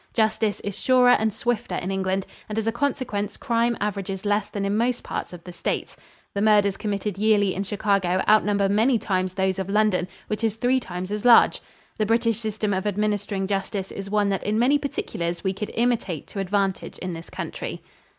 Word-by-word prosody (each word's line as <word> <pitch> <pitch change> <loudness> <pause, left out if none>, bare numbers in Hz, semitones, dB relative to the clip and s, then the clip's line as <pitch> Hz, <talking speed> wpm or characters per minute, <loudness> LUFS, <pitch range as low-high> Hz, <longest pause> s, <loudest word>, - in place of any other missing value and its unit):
Justice 220 -2 +1
is 200 -2 -4
surer 250 -1 +5
and 220 -2 +3
swifter 220 -3 -2
in 185 +2 -3
England, 190 0 -1 0.2
and 210 - -4
as 220 - 0
a 225 - +2
consequence 235 -5 -2
crime 235 -1 +1
averages 195 -1 -3
less 205 0 +1
than 200 -1 -3
in 200 +1 0
most 240 +2 0
parts - - -4
of 175 -1 -10
the 180 - -9
States. - - -3 0.4
The 200 - -1
murders 205 -2 +4
committed 205 -1 -3
yearly 205 -3 +3
in 195 - -3
Chicago 195 -2 +1
outnumber 205 -2 +4
many 225 +5 +3
times 185 -3 -1
those 190 0 0
of 190 0 -3
London, 210 -3 +2 0.2
which 215 +1 -4
is 220 -2 +1
three 250 +3 +2
times 185 -4 -6
as 210 0 -3
large. 245 -1 +6 0.4
The 215 - +1
British 230 0 +2
system 215 -2 -2
of 190 +2 -1
administering 205 -1 -1
justice 195 0 -2
is 195 0 -6
one 205 -1 +2
that 195 -1 0
in 210 +1 -1
many 265 +5 +4
particulars 175 - -3
we 190 -1 0
could 210 +2 -5
imitate 230 - 0
to 200 - -6
advantage 195 0 -1
in 185 - -4
this 165 0 -8
country. - - -6
205 Hz, 195 wpm, -24 LUFS, 195-220 Hz, 0.4 s, large